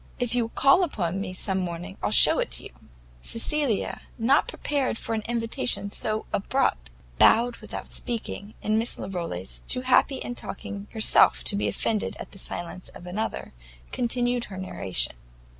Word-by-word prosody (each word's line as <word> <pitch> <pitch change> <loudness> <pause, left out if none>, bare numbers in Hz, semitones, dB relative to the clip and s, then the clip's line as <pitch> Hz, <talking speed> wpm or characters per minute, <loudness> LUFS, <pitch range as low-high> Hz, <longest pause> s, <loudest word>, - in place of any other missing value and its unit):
If 245 -2 -1
you'll 235 -2 +1
call 275 +9 +5
upon 195 - -2
me 195 - -4
some 190 +1 -2
morning, 175 +1 -5
I'll - - 0
shew - - +7
it - - -1
you." - - -10 0.5
Cecilia, 240 - 0 0.2
not 255 +5 +3
prepared 280 -5 -1
for 230 - -3
an 220 - 0
invitation 230 -3 -1
so 215 +1 -1
abrupt, 200 - 0 0.3
bowed 235 +1 +5
without - - -7
speaking, 220 -3 -5
and 215 +1 +2
Miss 230 - 0
Larolles, 170 - -4
too 255 - +3
happy 260 +2 +3
in 245 - -4
talking 200 -3 -7
herself 215 - +4
to 60 - +1
be 105 +1 0
offended 210 - -1
at - - -8
the 195 - -12
silence 175 0 -5
of 175 - -11
another, 210 +5 -4 0.4
continued 245 0 +1
her 190 - -9
narration. 140 - -1
215 Hz, 160 wpm, -26 LUFS, 185-245 Hz, 0.5 s, shew